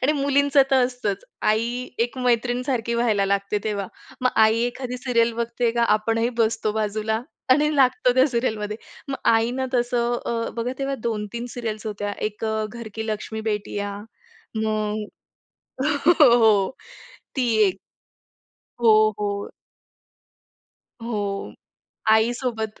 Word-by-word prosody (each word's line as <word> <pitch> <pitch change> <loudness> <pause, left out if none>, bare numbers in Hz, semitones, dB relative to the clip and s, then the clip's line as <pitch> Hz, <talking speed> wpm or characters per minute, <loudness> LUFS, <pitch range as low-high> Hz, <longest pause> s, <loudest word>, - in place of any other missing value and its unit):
आणि 280 +4 +3
मुलींचं 280 -1 +3
तर 260 -2 +5
असतंच 245 -6 -3 0.2
आई 235 +4 0
एक 240 +3 0
मैत्रीण 245 0 +1
सारखी 235 -3 -1
व्हायला 220 -4 +2
लागते 200 +1 0
तेव्हा. 205 -2 -2 0.3
मग 255 0 +2
आई 220 +1 +3
एखादी 250 0 -5
सीरियल 235 -2 +2
बघते 235 +1 0
का 235 0 +1
आपणही 225 +2 0
बसतो 220 -1 +1
बाजूला 220 +1 -1 0.3
आणि 300 +3 +4
लागतो 255 -2 +4
त्या 260 +1 +5
सीरियलमध्ये 220 -4 -2 0.3
मग 270 - -2 0.2
आईना 240 +4 +1
तसं 240 0 +1
अ, 230 -1 -1
बघा 235 +2 -2
तेव्हा 275 0 -1
2-3 230 +1 -3
सीरियल्स 225 -3 -4
होत्या. 205 -1 -3
एक 215 +1 -4
अ, 220 0 -1
"घर 235 -2 -7
की 220 0 -4
लक्ष्मी 220 +1 -4
बेटियां." 205 -1 -3 0.7
मग 215 -1 -1 1.1
हो. 225 -7 +6 0.7
ती 260 -3 +1 0.2
एक. 190 0 -2 1.0
हो, 215 -2 +5
हो. 205 -1 -2 1.5
हो. 205 -4 -3 0.6
आईसोबत 220 0 +1
230 Hz, 125 wpm, -23 LUFS, 215-245 Hz, 1.5 s, हो